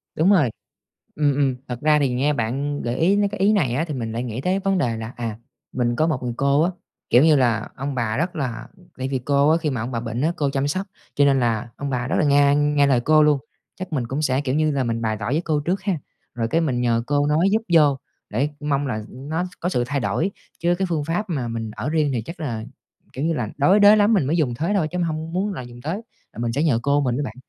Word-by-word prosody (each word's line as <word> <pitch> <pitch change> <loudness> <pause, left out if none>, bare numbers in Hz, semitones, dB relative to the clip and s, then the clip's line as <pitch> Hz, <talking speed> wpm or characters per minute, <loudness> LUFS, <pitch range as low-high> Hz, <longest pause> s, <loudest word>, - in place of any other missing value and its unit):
Đúng 165 +5 +3
rồi, 150 - +4 0.6
ừm, 145 -2 +2
ừm. 135 -3 +1
Thật 120 -1 -5
ra 150 0 +4
thì 140 -2 +2
nghe 140 +4 +2
bạn 140 +4 -2
gợi 120 +1 -2
ý 180 +7 +3
mấy 205 0 +2
cái 195 - -7
ý 200 +2 +4
này 150 - +1
á, 150 +6 0
thì 150 - -3
mình 115 -4 -4
lại 120 +2 -3
nghĩ 120 0 -4
tới 185 +6 0
vấn 195 -1 0
đề 120 -8 0
là, 110 +1 -6
à, 115 -3 -4 0.3
mình 120 -1 0
có 155 - +2
một 155 -6 -1
người 120 -1 -3
cô 140 +3 +3
á, 175 - +2 0.4
kiểu 125 +4 +6
như 155 -2 +6
là, 120 -4 +1
ông 135 +1 -4
bà 115 -3 -1
rất 175 +5 -2
là 125 -6 -4 0.3
tại 130 0 -2
vì 135 -1 -1
cô 140 +3 +2
á, 160 - +5
khi 160 -3 -1
mà 130 -4 -3
ông 115 +3 -4
bà 115 - -2
bệnh 115 0 -4
á, 160 +3 +2
cô 145 -2 0
chăm 135 +1 -1
sóc, 185 +6 -2 0.3
cho 145 - +4
nên 135 -1 +3
là 115 -1 0
ông 140 0 -4
bà 125 -1 -2
rất - - 0
là - - +3
nghe 140 0 +4
nghe 145 -1 +3
lời 130 -3 +3
cô 155 +4 +4
luôn. 150 -1 +4 0.4
Chắc 185 -2 -7
mình 125 -5 -1
cũng 135 +5 -3
sẽ, 135 -2 +1
kiểu 135 -2 -2
như, 155 +1 +2
là 135 -2 0
mình 115 -1 -2
bày 110 -1 0
tỏ 105 - -3
với 150 +4 +1
cô 155 -2 0
trước 185 +4 -1
ha, 190 -5 -1 0.4
rồi 115 -2 -1
cái 165 - +1
mình 130 -7 0
nhờ 115 -1 +1
cô 145 0 +1
nói 155 +5 +3
giúp 220 +1 +2
vô 145 -4 +5 0.3
để 125 +8 0
mong 145 -1 0
là, 130 - -2
ừm, 130 +3 -10
nó 165 +3 -1 0.2
có 175 - -1
sự 125 -9 0
thay 140 +2 -1
đổi. 165 +9 0 0.3
Chứ 175 +1 +2
cái 190 - 0
phương 160 -4 -1
pháp 180 +6 -2
mà 135 -7 -2
mình 115 -1 -4
ở - - -3
riêng 155 -2 +1
thì 115 - -1
chắc 165 +9 -9
là, 115 -8 -3 0.5
kiểu 135 - -3
như 165 - +1
là, 120 -7 -2
đối 185 +9 +4
đới 205 +1 +8
lắm 210 +1 +4
mình 180 -10 +2
mới 155 +5 +1
dùng 140 -8 +1
thế 165 +10 -1
thôi, 165 -6 +1
chứ 180 - -3
mình 175 - +1
hông 160 0 -4
muốn 195 +4 -1
là 145 - -5
dùng 120 0 -11
tới, 160 +6 -2 0.4
là - - -14
mình 115 0 -1
sẽ 140 +5 0
nhờ 145 -8 +2
cô 140 +2 +2
mình 125 -4 0
với 145 - -1
bạn. 110 - -6
145 Hz, 285 wpm, -22 LUFS, 125-160 Hz, 0.6 s, đới